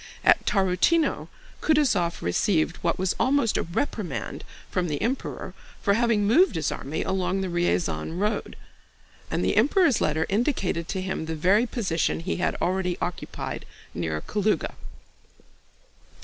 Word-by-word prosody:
At - - +5
Tarútino 195 - +2 0.3
Kutúzov 250 - +2
received 155 - +1
what 170 - 0
was 185 0 0
almost 260 -2 +2
a - - +2
reprimand 175 - -3 0.2
from 180 -1 -1
the 150 -3 -2
Emperor 245 +6 -3 0.3
for 200 - +2
having 225 -2 +2
moved 245 - +4
his 160 -3 0
army 145 +4 -3
along 190 0 -1
the 190 - -2
Ryazán 160 - 0
road, 210 +3 -1 0.7
and - - -1
the - - +1
Emperor's 285 - +4
letter 155 +1 +1
indicated 200 - 0
to 185 +5 -3
him 185 -4 -3
the 160 - -2
very 195 +9 +3
position 175 -10 -1
he - - -2
had - - 0
already 180 0 0
occupied 175 - -4 0.3
near 80 -2 -2
Kalúga. 210 - 0
190 Hz, 135 wpm, -26 LUFS, 170-220 Hz, 0.7 s, At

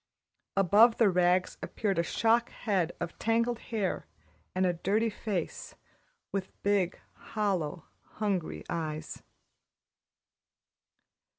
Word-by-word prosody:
Above 210 +5 +6
the 215 -4 +5
rags 180 0 +2
appeared 195 -5 -1
a - - +3
shock 230 +6 +2
head 185 -6 0
of 170 -1 -5
tangled 230 +1 +1
hair 210 -5 -2 0.5
and 185 0 +2
a 180 - +2
dirty 210 +6 +1
face, 200 -5 -4 0.6
with 195 -1 -2
big, 200 -3 +1
hollow, 185 -7 -2 0.3
hungry 200 -6 -2
eyes. 155 -2 -4
195 Hz, 100 wpm, -30 LUFS, 175-220 Hz, 0.6 s, Above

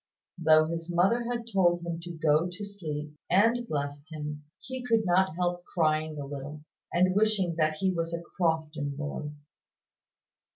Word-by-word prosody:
Though 155 -1 +6
his 165 +1 -4
mother 195 +8 +3
had 235 -1 -2
told 175 -2 +3
him 170 -1 -3
to 175 +1 -7
go 155 +2 +3
to 190 +4 -6
sleep, 150 -7 -5 0.2
and 230 +6 +3
blessed 145 +1 -4
him, 150 -1 -6
he 260 +1 -6
could 225 -3 +2
not 180 -2 +3
help 175 0 -1
crying 155 -3 0
a 145 - -4
little, 145 +2 -7 0.3
and 185 +1 +3
wishing 205 -4 +2
that 155 -1 +2
he 190 +4 +1
was 165 -2 -2
a 170 - -2 0.2
Crofton 160 -4 0
boy. 150 0 -4
170 Hz, 160 wpm, -29 LUFS, 155-190 Hz, 0.3 s, Though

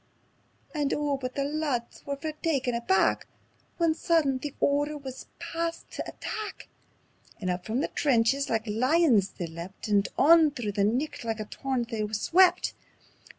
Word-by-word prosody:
_" 300 - -1
And 285 - +1
oh 295 -1 0
but 255 -2 -5
the 280 - 0
lads 285 -5 -2
were 280 - -1
fair 310 +3 -4
taken 270 -6 0
aback; 235 +11 +2 0.5
Then 335 -2 +3
sudden 315 -5 +2
the 285 +1 -6
order 290 +1 +1
wis 265 -2 -8
passed 335 0 -4
tae - - -5
attack, 430 -1 -6 0.7
And 185 -4 -1
up 180 0 -4
from 230 +5 0
the - - 0
trenches 270 0 +2
like 225 -1 0
lions 245 - +3
they 175 - -5
leapt, 170 +6 -8
And 205 -1 +3
on 320 +1 +7
through 245 -7 -4
the 200 0 0
nicht 245 +9 0
like 225 -1 -2
a 215 - -3
torrent 255 0 -3
they 225 -3 -2
swept. 360 - +4
270 Hz, 165 wpm, -28 LUFS, 225-305 Hz, 0.7 s, on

